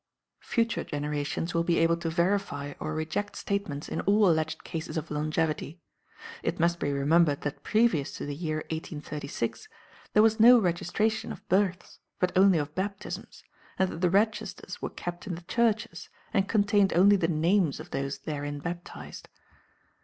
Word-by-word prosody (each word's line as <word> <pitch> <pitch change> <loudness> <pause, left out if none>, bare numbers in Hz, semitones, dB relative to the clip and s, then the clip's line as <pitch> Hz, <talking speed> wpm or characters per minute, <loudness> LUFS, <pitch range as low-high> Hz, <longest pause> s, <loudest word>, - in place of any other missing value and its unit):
Future 230 0 0
generations 150 +3 -3
will 170 0 +2
be 170 0 +1
able 165 0 +4
to 170 -1 -3
verify 170 -5 0
or 155 - -3
reject 160 +6 -3
statements 200 -8 -3
in - - -3
all 205 +1 +4
alleged 160 -1 0
cases 160 +1 -5
of 155 - -4
longevity. 155 +1 -1 0.6
It - - -2
must 170 +1 +2
be 145 - -1
remembered 145 +2 +3
that 145 - -4
previous 215 -11 +2
to - - -5
the 145 - -4
year 155 0 -3
1836 150 - -4 0.5
there 210 - +6
was 220 0 +3
no 245 +3 +9
registration 210 +3 0
of - - -10
births, 185 -1 0 0.2
but 180 0 0
only 190 -1 +6
of 150 -1 -2
baptisms, 200 +3 -5 0.3
and 190 -1 +1
that 165 - -7
the 180 - +3
registers 210 +5 -1
were - - -2
kept 175 +2 -7
in 180 - -2
the 170 - -9
churches, 225 +2 0 0.2
and 195 -2 +1
contained 205 -2 +3
only 195 +4 +6
the 175 -4 +1
names 170 0 +2
of 160 +3 -10
those 135 +1 -2
therein 145 -1 -4
baptized. 175 +3 -7
170 Hz, 160 wpm, -28 LUFS, 155-200 Hz, 0.6 s, no